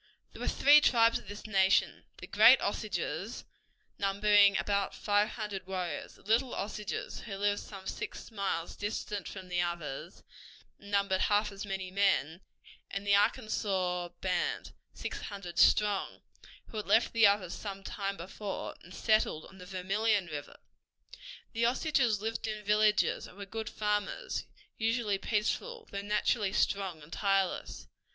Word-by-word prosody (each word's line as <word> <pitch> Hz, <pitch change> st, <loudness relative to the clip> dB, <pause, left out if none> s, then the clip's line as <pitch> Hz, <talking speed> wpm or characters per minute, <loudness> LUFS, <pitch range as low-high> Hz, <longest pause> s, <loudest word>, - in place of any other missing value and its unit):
There -, -, -11 dB
were -, -, -2 dB
three 295 Hz, +1 st, +6 dB
tribes 230 Hz, -4 st, +4 dB
of -, -, -17 dB
this 205 Hz, +1 st, -8 dB
nation: 195 Hz, -2 st, +2 dB
the -, -, -8 dB
Great -, -, +7 dB
Osages, -, -, -3 dB, 0.5 s
numbering 200 Hz, 0 st, +5 dB
about 200 Hz, -1 st, 0 dB
five 205 Hz, 0 st, +2 dB
hundred 205 Hz, -4 st, -5 dB
warriors; 180 Hz, -5 st, -4 dB
the -, -, -21 dB
Little 235 Hz, +5 st, +1 dB
Osages, 210 Hz, 0 st, -4 dB
who 200 Hz, -4 st, -7 dB
lived 205 Hz, 0 st, +1 dB
some 195 Hz, -2 st, -10 dB
six -, -, -6 dB
miles 195 Hz, -5 st, -2 dB
distant 205 Hz, -1 st, -4 dB
from 190 Hz, -2 st, -8 dB
the 180 Hz, -1 st, 0 dB
others, 170 Hz, -2 st, -5 dB, 0.6 s
and 200 Hz, -, -13 dB
numbered 200 Hz, -2 st, +1 dB
half 210 Hz, 0 st, +2 dB
as 200 Hz, +1 st, -7 dB
many 190 Hz, -2 st, -4 dB
men; 190 Hz, -4 st, +1 dB, 0.5 s
and 200 Hz, 0 st, -4 dB
the 200 Hz, -, +3 dB
Arkansas 195 Hz, -5 st, +1 dB
band, 180 Hz, -2 st, -1 dB, 0.2 s
six -, -, -5 dB
hundred 195 Hz, -4 st, -6 dB
strong, 205 Hz, -2 st, +3 dB, 0.5 s
who 220 Hz, -, -7 dB
had 210 Hz, -, -4 dB
left 220 Hz, +4 st, +3 dB
the 230 Hz, -2 st, +7 dB
others 200 Hz, -3 st, +1 dB
some 195 Hz, -2 st, -6 dB
time 195 Hz, -1 st, -3 dB
before, 190 Hz, +3 st, -6 dB
and 180 Hz, +2 st, -13 dB
settled 215 Hz, -8 st, +1 dB
on 190 Hz, -, -15 dB
the 180 Hz, -, -10 dB
Vermillion 195 Hz, +2 st, 0 dB
River. 150 Hz, -3 st, -7 dB, 1.0 s
The 230 Hz, 0 st, +2 dB
Osages 245 Hz, -4 st, +1 dB
lived 225 Hz, +2 st, -3 dB
in 215 Hz, -1 st, -5 dB
villages 210 Hz, 0 st, +3 dB
and 180 Hz, -, -16 dB
were 200 Hz, -, -6 dB
good 220 Hz, +3 st, -5 dB
farmers, 210 Hz, -, -2 dB, 0.3 s
usually 225 Hz, -3 st, 0 dB
peaceful, 445 Hz, -, -1 dB
although 200 Hz, -, -5 dB
naturally 205 Hz, 0 st, 0 dB
strong 190 Hz, -6 st, 0 dB
and 150 Hz, -, -12 dB
tireless. 195 Hz, -, 0 dB
200 Hz, 150 wpm, -31 LUFS, 190-215 Hz, 1.0 s, Great